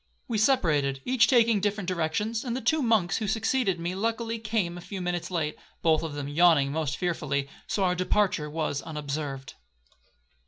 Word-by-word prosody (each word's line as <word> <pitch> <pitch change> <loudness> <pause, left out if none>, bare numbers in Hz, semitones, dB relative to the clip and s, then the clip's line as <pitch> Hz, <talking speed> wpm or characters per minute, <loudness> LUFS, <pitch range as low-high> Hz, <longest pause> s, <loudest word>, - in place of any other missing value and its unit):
We 225 -3 -1
separated, 150 - +2
each 250 -2 +4
taking 230 -4 +4
different 205 -1 -1
directions; 185 +6 -1
and 240 -3 -3
the - - -2
two 300 +7 +2
monks 220 -9 +2
who 220 - -2
succeeded 220 -2 +1
me 170 +2 -2
luckily 230 +3 -2
came 215 -6 -1
a 175 - -8
few 195 +2 -7
minutes 175 -1 -2
late, 160 -4 -2 0.3
(both 160 -2 +4
of 160 -3 -5
them 145 -1 -4
yawning 145 -2 +4
most 150 -1 -2
fearfully), 150 -6 -1 0.2
so 200 - 0
our 180 -1 +3
departure 180 -3 +1
was 150 -2 -2
unobserved. 145 -3 -5
180 Hz, 170 wpm, -27 LUFS, 155-220 Hz, 0.3 s, each